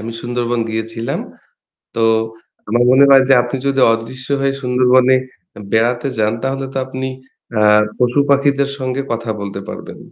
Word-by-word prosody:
আমি 115 +2 -6
সুন্দরবন 120 -1 -2
গিয়েছিলাম। 115 +1 -4 0.7
তো - - -2 0.7
আমার 120 +3 +2
মনে 130 +2 +6
হয় 135 -1 +7
যে - - +5
আপনি 125 +2 -4
যদি 135 -1 +1
অদৃশ্য 130 +3 -6
হয়ে 135 0 +1
সুন্দরবনে 125 +1 +3 0.6
বেড়াতে 120 +4 +1
যান 110 0 +1
তাহলে 135 0 -2
তো - - -10
আপনি 130 0 -5 0.5
আ - - +2 0.4
পশু-পাখিদের 140 +2 +2
সঙ্গে 130 +1 -3
কথা 115 -1 -3
বলতে 100 -1 -5
পারবেন। - - -8
125 Hz, 140 wpm, -17 LUFS, 115-135 Hz, 0.7 s, হয়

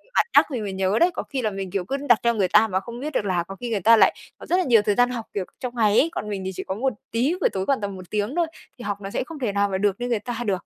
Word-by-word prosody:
bạn - - +4
nhắc - - +8
thì 235 - -2
mới 200 -2 -4
nhớ 190 +2 +1
đấy, 355 +1 +4
có - - -4
khi 270 -3 -4
là 215 -2 0
mình, 195 -2 -5
kiểu, 195 -3 -2
cứ 275 +6 -2
đặt 235 - +6
theo 235 0 +3
người 195 -3 +2
ta 215 +4 +5
mà 190 -2 0
không 235 +5 -9
biết 300 +2 -5
được 210 - 0
là 180 -3 0
có 195 +2 -9
khi 240 +3 -6
người 215 -3 0
ta 230 +4 +6
lại - - +5 0.2
có - - -11
rất 360 - +1
là 370 - +2
nhiều 230 -7 +5
thời 205 -1 +1
gian 245 0 +4
học, 235 -3 -4
kiểu, 195 -3 -2
trong 250 -1 -5
ngày 215 -2 +4
ấy, 325 - +3
còn 210 - -4
mình 200 -2 -3
thì 190 - -2
chỉ - - -4
có 190 - -4
một 255 +3 0 0.2
tí 250 +9 +1
buổi - - +4
tối 190 0 -3
khoảng 270 -6 +1
tầm 200 -1 -4
1 185 -1 -11
tiếng 210 +7 -2
thôi 340 -2 +2 0.3
thì 240 - -9
học 205 -1 -2
nó 195 - -5
sẽ - - -2
không 305 +1 -9
thể 235 -6 -1
nào 200 0 +1
mà 190 - -1
được 200 -1 +1
như 245 - -2
người 235 -3 0
ta 235 +2 -5
được. 190 -3 -1
215 Hz, 360 wpm, -24 LUFS, 195-245 Hz, 0.3 s, nhắc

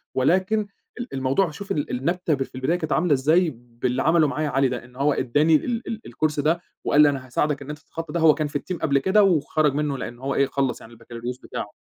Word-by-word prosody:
ولكن 185 +10 +2 0.3
ال 245 - -6
الموضوع 135 +7 +1
شوف 195 +6 -8
ال 145 - -1
النبتة 165 +6 -1
ب 135 -1 0
في 130 - -15
البداية 135 +7 0
كانت 160 -3 -4
عاملة 160 -1 +3
إزاي 155 +6 +3
باللي 120 +2 -3
عمله 160 -1 +4
معايا 150 +1 -2
علي، 135 0 +2
ده 125 -1 -5
إن 125 0 -19
هو 140 +3 +2
ادّاني 145 +6 +2
ال 235 +7 -1
ال 225 -1 -4
الCourse 155 -1 -1
ده 165 +4 +1 0.2
وقال 145 - +4
لي: 150 - +7
"أنا 135 -2 -4
هاساعدَك 145 +3 -1
إن 140 - -9
أنت 150 0 -6
تتخطى 165 +1 -8
ده"، 170 - 0
هو 160 -2 +6
كان 155 -2 -2
في 145 0 -3
الteam 180 -2 -5
قبل 140 -3 +2
كده 195 +8 +4
وخرج 155 -5 +2
منّه؛ 145 -1 -1
لأن 120 0 -6
هو 135 +1 -3
إيه، 140 - +3
خلّص 135 -3 -1
يعني 115 +1 -13
البكالوريوس 115 +2 -7
بتاعه. 105 - -6
150 Hz, 240 wpm, -23 LUFS, 130-165 Hz, 0.3 s, لي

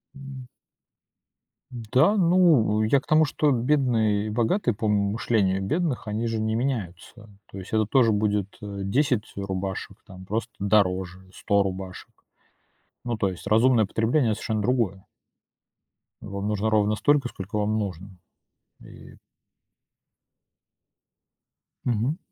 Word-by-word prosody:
М. 135 -2 -10 1.2
Да, 125 - +2
ну, 165 - +4
я 135 +6 +3
к - - -19
тому, 155 0 +4
что 150 0 +1
бедные 120 -5 +1
и - - -3
богатые 120 - 0
по 110 0 -2
мышлению 100 -1 +1
бедных, 145 - -2
они 110 +3 -2
же 115 -1 -2
не 110 0 -1
меняются. 115 -3 -4 0.2
То 100 - -9
есть 95 +3 -9
это 110 -1 +2
тоже 115 0 +3
будет, 105 -1 -1
э, 100 -1 -6
10 125 +1 0
рубашек, 95 +1 -5
там, 95 -3 -12
просто 115 +4 -3
дороже, 95 -2 0
100 100 -1 +1
рубашек. 95 -1 -6 0.9
Ну, 120 -2 -3
то 100 -2 0
есть 90 - -8
разумное 115 0 +4
потребление- 115 +5 +1
это - - 0
совершенно 110 -2 -2
другое. 105 -5 -1 1.2
Вам 100 +1 -5
нужно 105 +1 0
ровно 105 0 +2
столько, 145 +1 +2
сколько 100 +1 -6
вам 105 +1 0
нужно 95 -2 -5 0.7
и - - -14 2.7
Мгм. 120 +6 0
110 Hz, 125 wpm, -25 LUFS, 100-125 Hz, 2.7 s, ну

